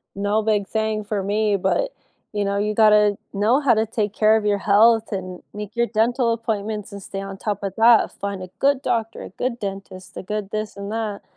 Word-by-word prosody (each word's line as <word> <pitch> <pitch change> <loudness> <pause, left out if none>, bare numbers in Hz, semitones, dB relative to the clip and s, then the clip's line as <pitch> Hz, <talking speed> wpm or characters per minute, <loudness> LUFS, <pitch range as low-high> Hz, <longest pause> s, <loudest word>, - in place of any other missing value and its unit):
no 205 +2 0
big 210 -2 +1
thing 220 -1 -1
for 205 -1 -2
me, 205 0 +1
but, - - 0 0.4
you 205 -1 -1
know, 200 0 -1
you 210 +1 0
gotta 210 -2 +5 0.2
know 215 +7 +3
how 275 -5 +3
to 220 +1 +1
take 210 -2 -2
care 215 0 +4
of 215 - -3
your 205 -1 +2
health 220 +3 +4
and 185 -2 -5
make 210 +1 -7
your 235 0 +1
dental 235 +2 +1
appointments 220 -2 -3
and 200 -1 -8
stay 195 - -6
on 195 0 -7
top 205 -1 -3
of 195 -1 -4
that. 230 0 +5
Find 200 -1 -5
a 185 - -6
good 280 -1 +2
doctor, 230 -3 -2
a - - -8
good 245 -1 -3
dentist, 195 -2 -7
a - - -6
good 210 +1 -4
this 215 -1 -4
and 200 0 -6
that, 215 -2 -3
210 Hz, 215 wpm, -22 LUFS, 200-225 Hz, 0.4 s, gotta